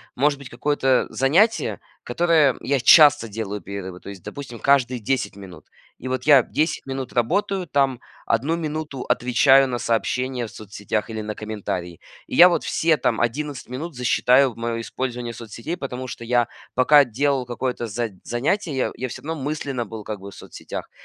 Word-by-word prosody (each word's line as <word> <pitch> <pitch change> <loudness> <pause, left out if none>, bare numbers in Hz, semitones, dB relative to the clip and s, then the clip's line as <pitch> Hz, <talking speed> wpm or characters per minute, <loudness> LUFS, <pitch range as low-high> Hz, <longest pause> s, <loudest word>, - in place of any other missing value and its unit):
может 140 +2 +2
быть 140 - -10
какое-то 135 0 +1
занятие, 175 - +2 0.2
которое 160 -6 +2
я 140 -2 0
часто 145 -8 +7
делаю 105 -1 -5
перерывы, 95 -1 -7
то - - -10
есть, 95 -4 -10
допустим, 130 -5 -8
каждые 130 -3 +2
10 125 -1 -2
минут. 95 -3 -12 0.3
И 130 - -7
вот 130 0 -2
я 145 -3 +7
10 155 +6 -2
минут 135 -1 -5
работаю, 185 - 0
там, 135 -3 +1 0.3
1 135 +9 +1
минуту 155 -4 -4
отвечаю 135 +2 +4
на 125 - -2
сообщения 120 +2 -1
в - - -14
соцсетях 105 +1 -4
или 110 -1 -4
на 105 0 -5
комментарии. 100 -5 -5 0.3
И - - -6
я 180 +2 +9
вот 175 - 0
все 160 -1 +2
там 115 -5 0
11 140 +3 -3
минут 145 +5 -6
засчитаю 125 +1 +3
в 115 - -17
моё 115 0 -3
использование 120 -1 -4
соцсетей, 115 - -7
потому 130 -2 -5
что 120 - -8
я, 120 0 +2 0.3
пока 140 +3 +6
делал 135 +2 0
какое-то 125 0 -3
за 115 +2 -3
занятие, 145 - -1
я 130 - 0
я 130 - -4
всё - - -8
равно 160 0 -5
мысленно 140 -4 -3
был 110 0 -8
как 105 -1 -6
бы 100 +1 -10
в - - -14
соцсетях. - - -8
125 Hz, 175 wpm, -22 LUFS, 115-145 Hz, 0.3 s, я